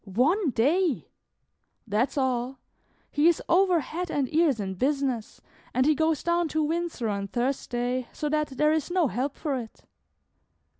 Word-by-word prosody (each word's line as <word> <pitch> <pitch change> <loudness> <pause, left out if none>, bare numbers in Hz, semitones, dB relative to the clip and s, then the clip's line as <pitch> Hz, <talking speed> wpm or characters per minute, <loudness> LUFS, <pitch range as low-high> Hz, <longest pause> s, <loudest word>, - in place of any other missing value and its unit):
"One 285 - +2
day!" 295 - +1 0.7
"That's 230 +6 0
all; 260 -1 0 0.5
he 295 +3 +3
is 340 - +4
over 360 -1 +4
head 350 +5 -5
and 280 -4 -1
ears 310 -7 +3
in 190 -2 -3
business, 260 0 -1 0.3
and 255 +1 +3
he 310 - +5
goes 315 0 +1
down 340 0 +1
to 315 0 0
Windsor 325 -6 -2
on 200 -1 -2
Thursday, 245 +1 -2
so 300 - -3
that 305 0 +1
there 300 +1 +4
is 315 0 -1
no 350 -5 +2
help 265 +4 -2
for 295 -4 -2
it." 235 -4 -7
280 Hz, 155 wpm, -27 LUFS, 245-320 Hz, 0.7 s, he